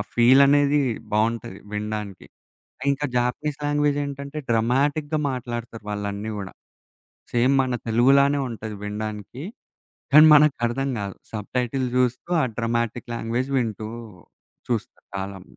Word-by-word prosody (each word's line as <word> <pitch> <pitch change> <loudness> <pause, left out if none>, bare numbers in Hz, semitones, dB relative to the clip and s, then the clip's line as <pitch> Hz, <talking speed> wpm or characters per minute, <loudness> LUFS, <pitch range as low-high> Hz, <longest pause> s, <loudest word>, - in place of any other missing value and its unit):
ఫీలనేది 140 +4 +5 0.3
బావుంటది 110 -2 0 0.2
వినడానికి. 105 -2 -4 0.7
ఇంకా 140 +1 -3
జాపనీస్ 130 +4 -1
లాంగ్వేజేంటంటే, 145 0 -1
డ్రమాటిక్‌గా 140 +7 +1
మాట్లాడతారు 120 -3 -5
వాళ్ళన్నీ 105 +1 -3
గ 105 - -5
కూడా. 95 -1 -6 0.8
సేమ్ 125 +3 +3
మన 125 -1 -1
తెలుగులానే 140 +5 +4
ఉంటది 110 -2 -6
వినడానికి. 105 +4 -5 0.7
కానీ 155 +1 +10
మనకర్థం 135 -3 +3
కాదు. 100 -1 -5 0.2
సబ్‌టైటిల్ 125 +4 -2
చూస్తూ 125 +5 0
ఆ - - +2
డ్రమాటిక్ 115 +1 -2
లాంగ్వేజ్ 120 +4 -2
వింటూ. 110 -3 -2 0.8
చూస్తా 115 -5 -2 0.2
కాలం 95 -1 -5
120 Hz, 105 wpm, -24 LUFS, 110-140 Hz, 0.8 s, కానీ